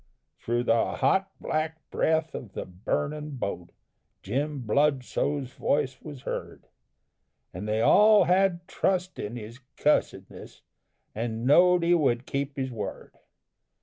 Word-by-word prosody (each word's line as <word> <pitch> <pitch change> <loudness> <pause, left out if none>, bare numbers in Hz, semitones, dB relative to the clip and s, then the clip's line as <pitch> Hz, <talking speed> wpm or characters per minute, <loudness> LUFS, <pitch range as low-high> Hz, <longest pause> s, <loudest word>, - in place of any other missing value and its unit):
Thro' 120 +1 -1
the 115 -1 +2
hot, 190 +9 +2
black 160 +1 -3
breath 160 0 +1
of 110 -7 -8
the - - -5
burnin' 145 +10 -3
boat 95 -6 -4 0.5
Jim 140 +7 -2
Bludso's 140 +1 0
voice 130 -2 -1
was 145 -4 -10
heard, - - -6 0.9
And 95 +4 -6
they 110 +1 0
all 210 - +6
had 180 -1 +2
trust 185 -1 -1
in 105 +3 -5
his 115 +1 -9 0.2
cussedness, 95 -10 -1 0.5
And 115 +1 -3
know'd 175 +5 +5
he 170 +1 +4
would 130 -7 +2
keep 140 0 -3
his 130 -1 -2
word. 110 -3 -6
140 Hz, 125 wpm, -27 LUFS, 115-160 Hz, 0.9 s, all